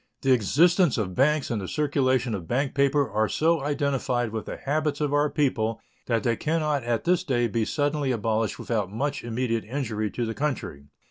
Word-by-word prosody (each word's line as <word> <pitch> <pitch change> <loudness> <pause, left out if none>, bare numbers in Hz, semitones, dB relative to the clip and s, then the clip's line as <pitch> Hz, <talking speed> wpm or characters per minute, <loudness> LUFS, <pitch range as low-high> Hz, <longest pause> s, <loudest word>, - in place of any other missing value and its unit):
The 135 - +3
existence 160 - +4
of 95 -5 -2
banks 145 +5 +2
and 110 -3 -1
the 95 - -5
circulation 130 - +1
of 90 -5 -5
bank 135 +2 0
paper 140 0 +2
are 110 +1 0
so 165 0 +2
identified 135 -5 -1
with 110 0 -5
the - - -5
habits 150 +1 -1
of 145 -2 0
our 145 +1 +3
people 115 -7 0 0.3
that 115 -3 +1
they 115 - +1
can 160 +7 -1
not 150 -4 0
at 120 -1 -1
this 180 0 +2
day 125 -7 +1
be 115 0 -1
suddenly 145 0 0
abolished 110 -1 -1
without 105 -5 -2
much 140 +6 -2
immediate 115 -1 -1
injury 110 -4 -3
to 120 - -3
the 115 - -3
country. 130 - -3
130 Hz, 195 wpm, -26 LUFS, 115-145 Hz, 0.3 s, existence